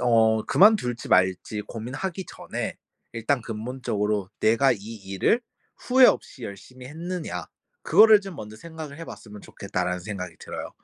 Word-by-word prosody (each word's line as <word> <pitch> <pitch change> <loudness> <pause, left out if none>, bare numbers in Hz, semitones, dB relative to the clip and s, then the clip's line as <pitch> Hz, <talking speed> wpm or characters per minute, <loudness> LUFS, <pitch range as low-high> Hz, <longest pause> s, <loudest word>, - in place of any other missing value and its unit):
어 110 -2 +4
그만둘지 190 - +4
말지 95 +3 +2
고민하기 135 - -5
전에 - - -5 0.4
일단 115 +3 0
근본적으로 105 -4 -2
'"내가 115 +5 +4
이 - - -3
일을 100 - -1 0.4
후회 255 0 +5
없이 130 - 0
열심히 125 +6 -10
했느냐." 170 +4 -5 0.4
그거를 215 -1 +7
좀 195 -5 -9
먼저 110 0 -8
생각을 160 +2 -9
해 165 - -6
봤으면 105 -2 -10
좋겠다.'라는 90 -2 -3
생각이 90 -3 -6
들어요. - - -6
115 Hz, 325 characters per minute, -25 LUFS, 105-160 Hz, 0.4 s, 그거를